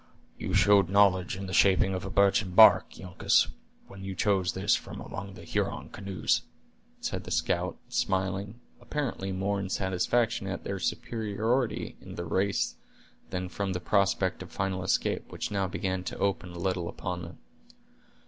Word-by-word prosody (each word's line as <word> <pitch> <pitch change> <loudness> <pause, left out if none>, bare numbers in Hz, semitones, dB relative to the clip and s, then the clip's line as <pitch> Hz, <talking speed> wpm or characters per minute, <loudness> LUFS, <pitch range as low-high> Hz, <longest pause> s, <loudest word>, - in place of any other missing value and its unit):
"You 95 - -3
showed 100 -2 +5
knowledge 95 -2 +4
in 100 - -5
the 95 - -6
shaping 95 0 +4
of 90 - -3
a 95 - -4
birchen 100 -1 +2
bark, 110 +1 +8
Uncas, 90 -1 +2 0.4
when 95 0 -11
you 95 -1 -5
chose 95 -2 +1
this 95 +2 +2
from - - -7
among 100 0 -7
the - - -11
Huron - - -2
canoes," 100 -2 -1 0.6
said - - -3
the - - -9
scout, - - 0
smiling, 95 +3 -1 0.2
apparently 120 -7 -3
more 100 +2 -1
in 95 -1 -4
satisfaction 100 +4 0
at 95 0 -4
their 100 -1 -3
superiority 110 +2 -1
in - - -10
the 85 - -4
race 95 +4 0 0.5
than 90 0 -3
from 95 +1 -3
that 90 - -5
prospect 100 -2 +2
of - - -8
final 95 -1 -2
escape 95 - 0
which - - -4
now 100 -2 0
began 95 0 -2
to - - -5
open 100 -2 -1
a 85 - -9
little 90 -1 -1
upon 90 -1 -4
them. 85 +1 -9
95 Hz, 165 wpm, -29 LUFS, 95-100 Hz, 0.6 s, bark